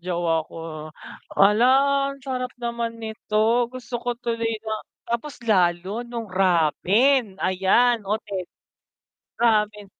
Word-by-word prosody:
jowa 170 -2 0
ko, 155 -2 -7 0.5
"Hala 210 +5 +5 0.4
ang 275 - -9
sarap 255 -2 -3
naman 235 -1 -3
nito!" 220 +1 0
Gusto 245 -1 -6
ko 245 -1 -2
tuloy 230 -2 -2
na 220 - -1 0.3
tapos 235 +5 -4
lalo 185 +2 +1
nung 235 -1 -6
ramen, 190 - +2
ayan, 195 +6 +2
okey. 200 -1 -3 0.9
Ramen. 210 -3 +1
220 Hz, 110 wpm, -23 LUFS, 190-240 Hz, 0.9 s, Hala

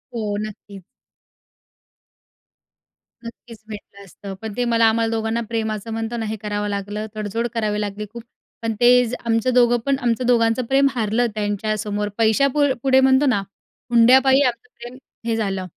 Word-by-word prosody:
हो, 210 -3 -2
नक्की. 205 -2 -9 2.4
नक्कीच 230 -1 -11
भेटलं 200 -1 -10
असतं. 195 +2 -10
पण 220 -1 -6
ते 245 - 0
मला 230 -1 +3
आम्हाला 225 0 0
दोघांना 225 +1 -1
प्रेम 220 -1 -2
असं 215 +2 -7
म्हणतो 225 +1 -3
ना, 225 - -3
हे 220 +1 -3
करावं 210 0 -3
लागलं, 205 +2 -4
तडजोड 215 +3 -2
करावी 210 -2 -1
लागली 210 +1 -4
खूप. 235 -1 -8 0.4
पण 225 -1 -1
ते 240 - +6 0.2
जे 235 - -4
आमचं 230 +2 +1
दोघं 240 -1 +4
पण 275 0 +2
आमचं 240 0 0
दोघांचं 235 0 +2
प्रेम 270 +3 +3
हारलं 225 +1 +1
त्यांच्यासमोर. 210 0 -2
पैशा 225 +5 +3
पु 295 -1 +3 0.2
पुढे 265 -1 +4
म्हणतो 265 +2 +4
ना, 245 -7 +2 0.5
हुंड्यापायी 265 +4 +5
आमचं 240 -4 -1
प्रेम 240 +2 -9 0.3
हे 230 -1 0
झालं. 195 -4 -2
225 Hz, 160 wpm, -21 LUFS, 210-240 Hz, 2.4 s, ते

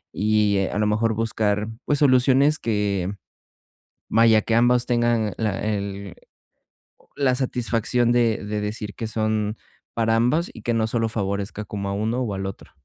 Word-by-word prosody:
y, 105 -1 +2
a - - -3
lo 105 - +2
mejor, 110 +2 +1
buscar, 105 -2 0 0.2
pues, 145 - +1
soluciones 135 +2 +4
que, 100 -4 -1 1.0
vaya, 110 0 +5
que 115 - -1
ambos 120 +1 +3
tengan 120 -4 +1
la 105 -4 -1
el 100 -2 -4 0.8
oh, - - -28
la 130 -3 +2
satisfacción 120 -2 0
de 115 -3 +1
de 105 0 -3
decir 105 0 -5
que 115 - -4
son 110 0 -1 0.4
para 115 -1 +1
ambos 125 +9 +1
y 110 - -11
que 120 - 0
no 110 -1 +1
solo 115 0 0
favorezca 100 0 -3
como 100 -1 -5
a - - -2
uno 110 +5 -1
o 115 -5 -2
al 95 0 -4
otro. 95 - -9
110 Hz, 165 wpm, -23 LUFS, 105-120 Hz, 1.0 s, vaya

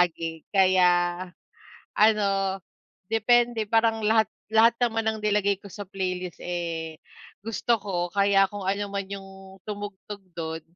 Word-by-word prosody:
palagi. 165 -2 -1
Kaya, 180 -2 +3 0.8
ano, 195 -3 +2 0.5
depende, 235 +1 +2
parang 225 +1 +1
lahat 220 0 +3 0.2
lahat 225 +1 +5
naman 225 -2 0
ng 220 0 0
nilagay 205 -1 +2
ko 200 - -11
sa 205 0 -8
playlist, 185 -2 -4
eh, 165 -2 -4 0.4
gusto 225 +2 0
ko 175 -4 -3
kaya 200 0 +4
kung 205 -2 -5
ano 200 +1 -1
man 200 -1 -3
yung 195 -1 -10
tumugtog 205 -1 -7
do'n, 160 -1 -4
200 Hz, 130 wpm, -26 LUFS, 180-215 Hz, 0.8 s, lahat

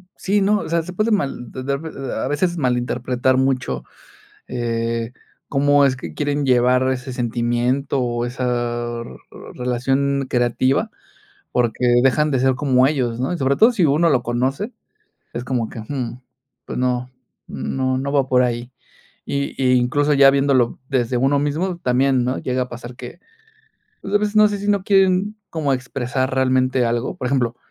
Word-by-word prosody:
sí, 200 +1 0
no, 205 +1 +3
o - - -6
sea, 170 0 +1
se 180 +2 -8
puede 215 +4 0
mal 135 - -1
de-de 135 +2 -3 0.4
a 110 - -2
veces 175 +4 0
malinterpretar 125 -1 0
mucho, 130 - 0 0.6
eh, 115 -1 -2 0.4
cómo 145 0 +3
es 130 -1 +2
que 130 - -8
quieren 145 -1 -1
llevar 125 0 +3
ese 130 0 -4
sentimiento 120 +3 0
o 120 -1 -1
esa, 120 -1 -2 0.5
relación 135 +3 0
creativa, 125 +2 +1 0.6
porque 125 0 0 0.2
dejan 150 +3 +3
de 130 -3 +1
ser 130 0 +3
como 130 -2 +3
ellos, 125 -5 -1
¿no?, 135 +7 -1
y 175 - -3
sobre 135 0 +1
todo 225 +3 +6
si 190 -8 +1
uno 155 +3 +3
lo 125 -4 +2
conoce, 130 - -2 0.6
es 120 +1 -4
como 120 -4 -1
que, 115 - -9
hum, 125 +1 -5 0.4
pues - - -6
no, 125 0 -1 0.4
no 130 -1 -2
no 140 +2 -3
va 140 -2 +2
por 125 -1 +4
ahí, 120 +1 -2 0.5
y 140 0 -3
y 130 0 +4
incluso 145 +4 +2
ya 135 -1 +7
viéndolo 135 -3 +2
desde 125 -2 0
uno 135 +3 +2
mismo, 165 +5 -1
también, 130 -1 +2
¿no?, 130 +1 -1
llega 125 0 -1
a 125 - -12
pasar 120 +1 -9
que, 125 +8 -10 0.8
pues, 195 - -5
a 205 - +6
veces 210 0 -2
no 215 0 +7
sé 205 - -3
si 205 +1 -4
no 200 -2 +1
quieren 195 +1 +2
como 150 -4 -1
expresar 130 0 -3
realmente 130 -1 +2
algo, 120 +2 -2
por 125 - -4
ejemplo, 125 -3 0
130 Hz, 165 wpm, -20 LUFS, 125-145 Hz, 0.8 s, ya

